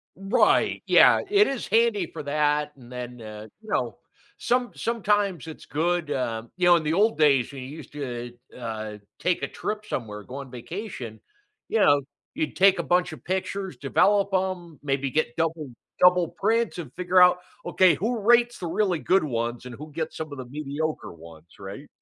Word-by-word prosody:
Right, 195 +5 +2
yeah, - - +6
it 415 +1 +5
is 270 -4 -3
handy 220 -4 +2
for - - -8
that 150 0 +1
and 125 -3 -15
then, 125 -1 -7
uh, 110 0 -9
you 220 - -14
know, - - -1 0.4
some 245 0 0
sometimes 205 - 0
it's 160 - -9
good, 165 +1 -1
um 115 -3 -3
you 180 - +1
know, 175 - +8
in 165 - +1
the 155 - 0
old 215 +5 +3
days, 140 -5 +4
when 135 -2 -8
you 130 - -8
used 150 -1 -10
to, 120 -4 -5 0.2
uh - - -11
uh, 110 -2 -5 0.2
take 180 - 0
a 140 - 0
trip 215 0 -4
somewhere, 105 - -5
go 125 - -10
on 140 -2 -7
vacation, 125 - -7 0.5
you 225 - +1
know, 145 -7 +5 0.3
you'd 315 0 -2
take 195 0 +5
a 170 - 0
bunch 175 +3 +1
of - - -12
pictures, 190 +1 -3
develop 200 +8 +2
'em, 185 -4 -2
maybe 140 -1 -1
get 155 -6 0
double 160 -3 -1 0.3
double 180 -1 +5
prints, 230 -3 0
and 150 -8 -7
figure 180 +1 +2
out, 180 0 +6 0.3
"Okay 185 -5 +4
who 230 +5 -1
rates 240 +3 +3
the 175 - -4
really 180 -1 0
good 190 -2 +2
ones 120 -3 -3
and 125 - -8
who 150 +3 -10
gets 160 +1 -4
some 155 -1 -5
of 145 - -7
the 130 - -6
mediocre 150 +3 -4
ones?" 85 0 -14
right? 100 +9 -9
160 Hz, 190 wpm, -25 LUFS, 130-190 Hz, 0.5 s, know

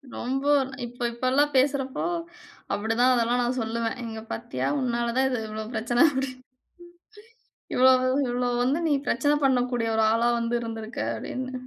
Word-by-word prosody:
ரொம்ப, 270 +3 -3 0.4
இப்போ 245 +1 -7
இப்போலாம் 260 +5 +1
பேசுறப்போ, 270 0 +1 0.7
அப்படிதான் 225 +5 +2
அதெல்லாம் 240 +1 +1
நான் 255 +2 -1
சொல்லுவேன். 230 +2 -2
இங்க 220 -1 -6
பாத்தீயா 235 +1 -3
உன்னால 235 -2 -1
தான் 265 0 +3
இது 250 -3 -1
இவ்வளோ 215 0 -5
பிரச்சன, 240 +4 +3
அப்படின்னு. 265 -1 -3 1.3
இவ்வளவு, 255 0 +5 0.2
இவ்வளவு 245 0 0
வந்து 270 +6 +1
"நீ 295 - +3
பிரச்சன 290 +5 +2
பண்ணக்கூடிய 245 -3 +1
ஒரு 220 - +3
ஆளா 235 +1 +2
வந்து 230 +1 -1
இருந்துருக்க" 225 0 -6
அப்படின்னு. 255 - -5
245 Hz, 140 wpm, -26 LUFS, 230-260 Hz, 1.3 s, இவ்வளவு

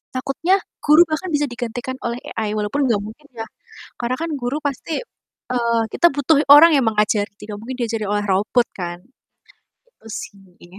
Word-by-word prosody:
takutnya 275 +8 +1 0.3
guru 300 +3 +6
bahkan 325 +4 -3
bisa 295 0 +2
digantikan 245 +1 -5
oleh 235 +1 -4 0.2
AI 215 -2 -1
walaupun 235 +7 0
gak 205 -3 +1
mungkin 240 +8 -11
ya, 225 -1 -5 0.6
karena 245 +1 -1
kan 330 0 -3
guru 250 +3 -2
pasti 290 - -3 0.5
eee, 235 -1 +1
kita 345 - +4
butuh 290 +2 +3
orang 310 +4 +9
yang 270 -4 +3
mengajari 210 -1 +1
tidak 210 0 -8
mungkin 250 +4 -6
diajari 225 -3 -2
oleh 205 0 0
robot 210 +5 +2
kan, 175 -1 -4 0.9
gitu - - -25
sih. 190 -2 -10
240 Hz, 160 wpm, -20 LUFS, 210-285 Hz, 0.9 s, orang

